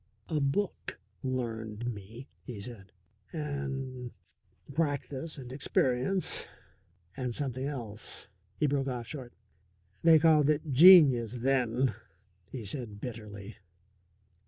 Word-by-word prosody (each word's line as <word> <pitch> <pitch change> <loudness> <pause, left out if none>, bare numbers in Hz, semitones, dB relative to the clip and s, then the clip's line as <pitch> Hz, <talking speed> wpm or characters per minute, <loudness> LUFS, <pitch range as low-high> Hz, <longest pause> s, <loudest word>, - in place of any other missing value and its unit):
"A 155 - +1
book 145 - -1 0.2
'learned' 115 -2 -3
me," 110 +6 -10
he 120 -5 -8
said, 100 -3 -10 0.4
"and 135 -4 -4 0.6
practice 145 0 -2
and 125 -3 -8
experience 135 +6 0 0.7
and 125 -3 -3
something 130 -1 -2
else." 115 -10 -4 0.3
He 150 - +1
broke 140 -1 +1
off 125 -3 -3
short. 130 -2 -7 0.7
"They 165 -1 +7
called 155 -2 +5
it 150 0 0
genius 135 - +8
then," 125 -2 +2 0.6
he 120 -5 -6
said 110 -2 -5
bitterly. 105 -3 -8
130 Hz, 105 wpm, -30 LUFS, 115-145 Hz, 0.7 s, genius